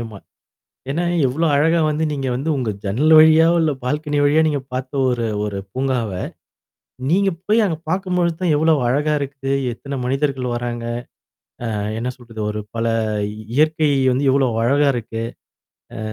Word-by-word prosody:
ஆமா. 110 Hz, -3 st, -7 dB, 0.7 s
ஏன்னா 170 Hz, +5 st, -1 dB, 0.2 s
எவ்வளோ 155 Hz, +7 st, 0 dB
அழகா 165 Hz, +4 st, +3 dB
வந்து 150 Hz, +1 st, -1 dB
நீங்க 135 Hz, -2 st, -3 dB
வந்து 140 Hz, +6 st, -2 dB
உங்க 125 Hz, -4 st, -1 dB
ஜன்னல் 130 Hz, +11 st, +2 dB
வழியாவோ, 160 Hz, +2 st, +6 dB
இல்ல 160 Hz, -2 st, +2 dB
பால்கனி 150 Hz, +3 st, -1 dB
வழியாவோ 155 Hz, +2 st, +4 dB
நீங்க 145 Hz, -3 st, -1 dB
பார்த்த 130 Hz, +1 st, -4 dB, 0.2 s
ஒரு 120 Hz, -2 st, -1 dB, 0.2 s
ஒரு 100 Hz, -1 st, -4 dB, 0.2 s
பூங்காவ, 130 Hz, -4 st, -1 dB, 1.0 s
நீங்க 195 Hz, +3 st, +3 dB, 0.2 s
போய் 220 Hz, +2 st, +3 dB
அங்க 165 Hz, -5 st, -1 dB
பார்க்கும்பொழுது 180 Hz, -2 st, 0 dB
தான் 175 Hz, -3 st, +2 dB
எவ்வளோ 160 Hz, +2 st, +3 dB
அழகா 150 Hz, +4 st, +1 dB
இருக்கு, 135 Hz, -1 st, -4 dB, 0.2 s
எத்தன 140 Hz, +3 st, -6 dB
மனிதர்கள் 135 Hz, -1 st, -1 dB
வராங்க. 120 Hz, -1 st, -4 dB, 0.9 s
அ -, -, -2 dB, 0.2 s
என்ன 125 Hz, +2 st, -2 dB
சொல்றது, 115 Hz, -3 st, -9 dB
ஒரு 105 Hz, 0 st, -3 dB, 0.2 s
பல 115 Hz, 0 st, -1 dB, 0.7 s
இயற்கை 155 Hz, +1 st, +3 dB, 0.2 s
வந்து 130 Hz, +3 st, 0 dB
எவ்வளோ 135 Hz, -1 st, +3 dB, 0.2 s
அழகா 140 Hz, +4 st, +3 dB
இருக்கு. 115 Hz, -1 st, -4 dB, 0.7 s
அ -, -, -6 dB
140 Hz, 150 wpm, -20 LUFS, 125-160 Hz, 1.0 s, வழியாவோ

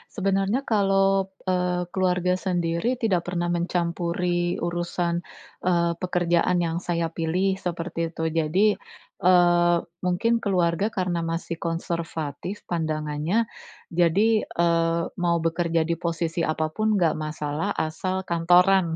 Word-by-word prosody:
Sebenernya. 195 Hz, +4 st, +1 dB
Kalau, 195 Hz, -3 st, +2 dB
eee, 180 Hz, -1 st, 0 dB
keluarga 180 Hz, -1 st, +1 dB
sendiri 175 Hz, +5 st, 0 dB
tidak 195 Hz, -8 st, 0 dB
pernah 175 Hz, -1 st, -1 dB
mencampuri 175 Hz, 0 st, -1 dB
urusan, 175 Hz, 0 st, -1 dB, 0.5 s
eee, 170 Hz, -1 st, +2 dB
pekerjaan 180 Hz, 0 st, +1 dB
yang 165 Hz, 0 st, -1 dB
saya 170 Hz, -2 st, -2 dB
pilih 185 Hz, +4 st, 0 dB
seperti 170 Hz, -1 st, -3 dB
itu. 160 Hz, -, -4 dB
Jadi, 165 Hz, +6 st, +2 dB, 0.5 s
eee, 175 Hz, -2 st, +5 dB, 0.2 s
mungkin 190 Hz, +6 st, +1 dB
keluarga 180 Hz, -2 st, +1 dB
karena 180 Hz, -3 st, -1 dB
masih 165 Hz, 0 st, -3 dB
konservatif 165 Hz, +1 st, -4 dB
pandangannya. 155 Hz, +5 st, -1 dB, 0.4 s
Jadi, 195 Hz, +6 st, +3 dB
eee, 170 Hz, 0 st, +1 dB, 0.2 s
mau 170 Hz, -1 st, +2 dB
bekerja 165 Hz, 0 st, +1 dB
di 170 Hz, +1 st, -2 dB
posisi 170 Hz, 0 st, -2 dB
apapun 160 Hz, +8 st, 0 dB
enggak 165 Hz, -5 st, +2 dB
masalah, 155 Hz, +4 st, -3 dB
asal 185 Hz, +4 st, -2 dB
kantoran. 175 Hz, 0 st, +3 dB
175 Hz, 110 wpm, -25 LUFS, 165-185 Hz, 0.5 s, eee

